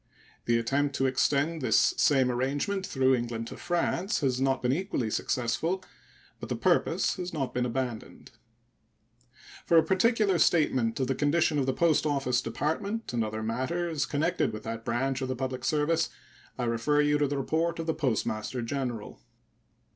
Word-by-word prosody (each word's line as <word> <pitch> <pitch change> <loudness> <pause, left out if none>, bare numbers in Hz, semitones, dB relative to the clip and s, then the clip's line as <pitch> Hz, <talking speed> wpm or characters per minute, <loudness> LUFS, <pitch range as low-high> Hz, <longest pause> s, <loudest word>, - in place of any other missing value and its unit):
The 120 0 +3
attempt 140 +4 0
to 135 - +1
extend 145 +4 +1
this 130 - +3
same 130 -3 +3
arrangement 145 +10 -1
through 130 -1 +2
England 120 -2 -2
to - - -8
France 175 +3 -1
has 130 -2 0
not 135 -1 +1
been 125 +1 +2
equally 150 - -2
successful, 160 - -1 0.6
but - - -7
the - - -1
purpose - - +1
has 180 -1 -4
not 135 -5 -2
been 125 0 0
abandoned. 120 -2 -5 1.4
For 170 - +5
a 160 - +7
particular 195 +1 +2
statement 130 -9 +2
of 130 - +1
the 135 - 0
condition 150 +2 +2
of 135 - 0
the - - +3
Post 160 -1 +2
Office 135 -4 +1
Department 160 - -3
and 115 -1 +1
other 110 0 -4
matters 150 +8 -1
connected 160 -1 0
with 110 - -7
that 115 0 -5
branch 130 +3 -1
of 130 - -1
the 130 - -2
public 130 0 -4
service 155 +3 +1 0.5
I 125 - -2
refer 120 +5 +1
you 145 0 +2
to 145 - +2
the 140 +1 -2
report 160 +5 0
of 165 - -4
the 160 - 0
Postmaster 120 -3 -2
General. 120 -3 -4
135 Hz, 170 wpm, -28 LUFS, 125-160 Hz, 1.4 s, a